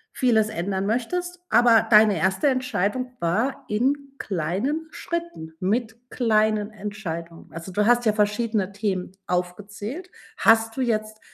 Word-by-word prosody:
vieles 220 -4 +3
ändern 190 -1 -2
möchtest, 355 - -2
aber 230 -1 +5
deine 210 -2 +6
1. 190 +10 +1
Entscheidung 250 -1 -1
war 215 +11 -1
in 275 +6 -1
kleinen 205 - -2
Schritten 340 - -5
mit 225 +4 -2
kleinen 215 -3 +2
Entscheidungen. 195 -6 -7
Also, 165 +3 -8
du 210 +3 +1
hast 240 0 +4
ja 215 - +4
verschiedene 210 -1 0
Themen 195 -3 -3
aufgezählt. 205 - -4 0.3
Hast 225 +1 +4
du - - 0
jetzt 215 -2 -1
215 Hz, 125 wpm, -24 LUFS, 195-245 Hz, 0.3 s, deine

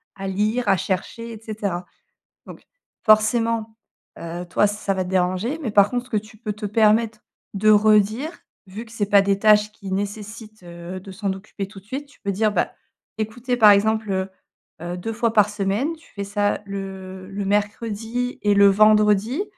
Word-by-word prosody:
à 195 0 -6
lire, 210 +5 -1
à 195 - +4
chercher 220 +6 -3
et 225 - -9
cetera» 205 -5 -4 0.6
donc, - - -11 0.4
forcément, 220 0 +3 0.4
heu, 170 +1 -6
toi 195 - +3
ça 205 -1 -1
va 190 -1 -1
te 180 - -7
déranger, 185 - 0
mais 240 -8 -3
par 200 0 +5
contre 245 +1 -2
ce - - -18
que 220 - 0
tu 215 +1 -7
peux 215 -1 -4
te 210 +1 -7
permettre 215 +1 +2 0.3
de 210 +2 +2
redire, 215 +6 +4 0.3
vu 205 +5 -8
que 225 - -17
c'est 225 -2 -1
pas 200 -1 +6
des 195 0 +1
tâches 210 0 +4
qui 200 -3 -9
nécessitent 210 +1 -5
de 175 +2 -9
s'en 195 0 -2
occuper 195 0 -7
tout 195 0 -12
de - - -29
suite, 270 +6 -6
tu 285 - -23
peux 200 - -2
dire: 210 +2 +1
«Bah, - - 0 0.5
écoutez 240 +3 -2
par 215 -3 +8
exemple, 220 +1 +2
heu 190 0 -1 0.5
heu, 175 +1 -5
2 225 +6 -4
fois 230 0 0
par 210 -2 +4
semaine», 210 +10 -1
tu 325 - -22
fais 200 - -3
ça 205 +1 0
le 190 -1 -7
le 200 0 -4
mercredi 220 +4 -2
et 205 -1 +3
le 200 0 +7
vendredi. 215 - +4
210 Hz, 185 wpm, -22 LUFS, 195-220 Hz, 0.6 s, par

